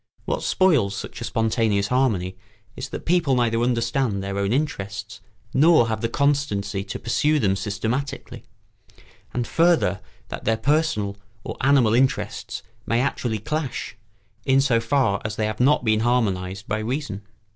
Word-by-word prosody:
What - - -1
spoils 140 - +2
such - - -7
a - - -2
spontaneous 110 -3 +1
harmony 110 -9 +1 0.4
is 130 - -6
that - - -7
people 165 -6 +2
neither 115 -2 +1
understand 120 -3 0
their 100 0 -3
own 100 0 0
interests 100 -7 -3 0.3
nor 150 -4 +5
have 110 -1 -2
the 115 - 0
constancy 135 -9 0
to 100 - -5
pursue 150 +6 +1
them 100 -8 +2
systematically; 110 +8 -3 0.9
and 120 -1 -2
further, 165 - +2 0.3
that - - -6
their 110 0 +1
personal 130 -9 0 0.3
or - - -5
animal 130 -5 +4
interests 130 +2 0 0.2
may 115 - +2
actually 120 -3 -1
clash, 135 +2 -4 0.5
in 135 0 +3
so 130 -4 +3
far 115 -3 +1
as 110 -1 -3
they 110 - 0
have 110 -1 -3
not 130 +1 +3
been 110 -1 +3
harmonised 100 -5 0
by 105 +1 -1
reason. 120 -2 -3
115 Hz, 150 wpm, -23 LUFS, 100-135 Hz, 0.9 s, nor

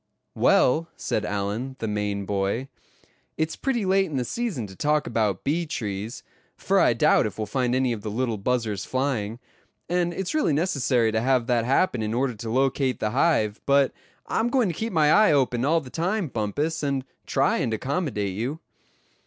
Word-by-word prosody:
"Well," 160 +6 +3
said 110 - -2
Allan, 105 +6 -3
the 110 - -3
Maine 105 -1 -2
boy, 100 +7 -1 0.7
"it's 160 0 -1
pretty 240 -7 -1
late 190 +1 +3
in 150 -5 -4
the 125 - -1
season 210 - -3
to 95 -1 -11
talk 150 +5 +1
about 105 -5 0
bee 165 +4 0
trees, 110 - -4 0.3
for 195 0 +2
I 120 - +4
doubt 115 - +3
if 105 - -8
we'll 110 - -2
find 125 +2 0
any 130 -2 +1
of 110 - -6
the 105 - -4
little 115 0 -1
buzzers 110 -2 -1
flying; 125 -5 -2 0.5
and 175 0 +1
it's 190 +1 -3
really 305 - +2
necessary 140 -8 +1
to 110 0 0
have 130 -1 +2
that 120 -2 +1
happen 130 -1 +2
in 110 +1 -2
order 130 0 0
to 110 +1 -7
locate 130 +1 +1
the 105 - -1
hive; 120 -6 +1
but 140 -1 +4 0.3
I'm 230 +2 0
going 245 -6 +2
to - - -2
keep 225 +7 -3
my 155 -3 +3
eye 210 -5 +6
open 125 -3 +1
all 160 +4 +3
the 130 -4 -12
time, 180 +1 -1
Bumpus, 135 +9 -2
and 140 -3 -1 0.2
try 135 0 +2
and 120 - -1
accommodate 110 - -2
you." 125 +10 -3
130 Hz, 185 wpm, -25 LUFS, 110-160 Hz, 0.7 s, eye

